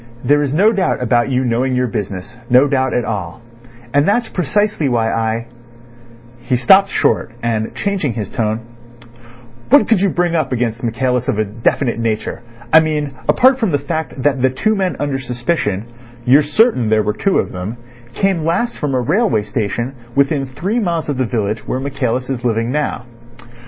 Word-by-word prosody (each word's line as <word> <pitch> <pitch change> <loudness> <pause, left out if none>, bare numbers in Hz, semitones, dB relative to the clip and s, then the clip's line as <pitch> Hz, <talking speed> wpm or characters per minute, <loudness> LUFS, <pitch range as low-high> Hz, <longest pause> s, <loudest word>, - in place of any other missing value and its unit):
"There 145 +3 +3
is 140 -2 -1
no 195 +9 +4
doubt 195 -4 0
about 120 +1 +2
you 130 0 0
knowing 125 +2 0
your 125 0 +1
business—no 115 +4 0
doubt 130 -2 0
at 120 - 0
all; 100 -6 -4 0.5
and 145 +2 +3
that's 230 +3 +1
precisely 185 -2 0
why 115 -2 +1
I—" 115 0 -1 0.9
He 120 +1 -1
stopped 190 +11 +5
short, 115 - 0
and 110 -2 -1
changing 190 -11 -1
his 105 -3 -5
tone: 110 0 -1 1.1
"What 285 +3 +6
could 220 -5 +3
you 200 - +3
bring 175 -1 0
up 155 -5 0
against 120 -2 -1
Michaelis 125 +1 -1
of 130 -6 0
a 110 - +1
definite 115 +3 -1
nature? 115 0 -2 0.3
I 160 - +10
mean 150 -3 -1 0.2
apart 260 +1 +5
from 225 -5 +1
the 145 - +2
fact 145 -2 -4
that 135 -2 +1
the 130 - +4
two 215 +12 0
men 190 -2 -1
under 140 -2 -1
suspicion—you're 120 - -1
certain 150 - +2
there 110 -1 +3
were 105 - 0
two 195 - +1
of - - -1
them—came 120 - -4
last 175 +10 -1
from 140 -3 -1
a 125 - +1
railway 160 - +1
station 115 +4 -3 0.2
within 140 0 +1
three 175 - -2
miles 170 -7 -1
of 140 -3 -2
the 130 - +2
village 110 -2 -2
where 130 - -1
Michaelis 130 -2 -2
is 130 -3 -4
living 115 0 0
now." 145 -3 -2
130 Hz, 175 wpm, -17 LUFS, 115-155 Hz, 1.1 s, I